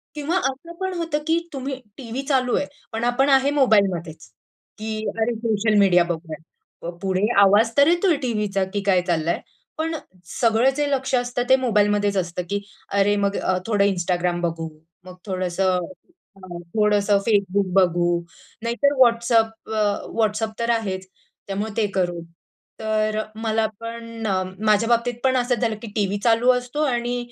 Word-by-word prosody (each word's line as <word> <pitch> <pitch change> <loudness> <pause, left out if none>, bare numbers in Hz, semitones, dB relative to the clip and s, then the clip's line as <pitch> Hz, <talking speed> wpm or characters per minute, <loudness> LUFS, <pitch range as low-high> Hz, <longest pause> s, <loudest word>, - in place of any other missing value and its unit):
किंवा 305 +4 -1
असं 280 +2 -3
पण 375 0 -2
होतं, 330 -3 -1
की 330 +1 +3
तुम्ही 265 0 -4 0.2
टीव्ही 250 0 -5
चालू 255 -3 +2
आहे, 285 - 0 0.3
पण 225 +1 -3
आपण 245 +3 +2
आहे 270 +1 +4
मोबाईलमध्येच, 190 - +1 0.5
की 215 0 -4 0.2
"अरे 230 +1 +1
सोशल 220 -1 +1
मीडिया 180 -3 +5
बघूया." 160 -1 -8 0.6
पुढे 190 -1 0 0.2
आवाज 205 +3 +5
तर 280 - +6
येतोय 350 +1 +3
टीव्हीचा, 210 -6 -1
की 190 +2 -4
काय 190 -2 +3
चाललंय. 170 -1 0 0.4
पण 320 +1 -2 0.5
सगळं 230 +2 +4
जे 290 -1 0
लक्ष 265 -1 -1
असतं 245 0 -1
ते 260 - +8
मोबाईलमध्येच 205 -4 +1
असतं, 180 0 -2
की 200 0 0 0.4
अरे, 200 +1 +3
मग 200 0 0
अ, 185 - 0
थोडं 205 -3 +2
Instagram 175 -1 -1
बघू, 165 -1 -2 0.4
मग 185 - -10
थोडंसं 185 -1 0 0.7
हां. 185 -3 -9 0.2
थोडंसं 210 -1 +3
Facebook 200 -2 +1
बघू, 175 -2 +3 0.5
नाहीतर 240 +5 +1
WhatsApp 230 -1 +3 0.2
अ, 205 -1 0
WhatsApp 215 0 0
तर 235 0 -1
आहेच. 190 -5 -2 0.4
त्यामुळे 205 +3 -3
ते 215 - +2
करू. 175 -2 0 0.6
तर 215 0 0
मला 220 0 0
पण 230 0 -7 0.4
माझ्या 215 +2 +3
बाबतीत 240 +1 +2
पण 260 -1 +3
असंच 245 -1 0
झालं, 225 -2 0
की - - -5
टीव्ही 205 -2 0
चालू 235 +2 +4
असतो 250 +5 -2
आणि 240 -2 -1
220 Hz, 150 wpm, -22 LUFS, 195-245 Hz, 0.7 s, ते